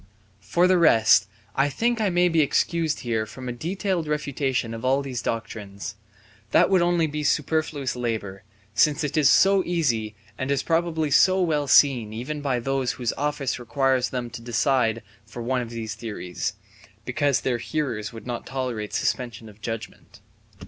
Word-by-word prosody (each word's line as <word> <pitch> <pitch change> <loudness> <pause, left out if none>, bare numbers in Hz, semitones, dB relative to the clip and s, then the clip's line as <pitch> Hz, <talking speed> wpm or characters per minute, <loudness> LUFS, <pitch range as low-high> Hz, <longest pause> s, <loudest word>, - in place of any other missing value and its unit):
For 110 - +1
the 185 -1 +4
rest 115 -10 +5 0.3
I 140 +2 +2
think 235 - 0
I 210 - +2
may 175 0 +3
be 165 -2 +3
excused 160 +2 +1
here 110 -3 -1
from 130 +3 -9
a - - -2
detailed 175 - -2
refutation 140 -5 -1
of 115 - -7
all 135 +2 +2
these 130 -3 -4
doctrines; 105 -3 -5 0.6
that - - +4
would 185 -2 +5
only 175 -1 +2
be 150 0 -3
superfluous 150 -2 0
labour, 110 -6 -3 0.3
since 150 +8 +3
it 150 - -2
is 150 -4 +5
so 195 +3 +5
easy, 120 -12 -1 0.2
and 130 - -2
is 140 -1 +1
probably 165 -2 0
so 185 +7 +5
well 150 -4 0
seen 125 -6 +4
even 140 +7 -5
by 135 -3 0
those 135 +1 -1
whose 120 -3 -2
office 145 -3 -2
requires 130 +1 +1
them 125 -2 -4
to 115 - -8
decide 115 -1 +1 0.2
for 110 +2 -8
one 125 +1 0
of 120 - -6
these 115 -2 -5
theories 110 -6 -4 0.5
(because 145 -2 +1
their 125 -2 -1
hearers 120 -6 -3
would 115 -1 -10
not 120 -1 -5
tolerate 125 -6 -4
suspension 120 -3 -2
of 105 +1 -18
judgement). 115 0 -7
130 Hz, 170 wpm, -24 LUFS, 115-155 Hz, 0.6 s, rest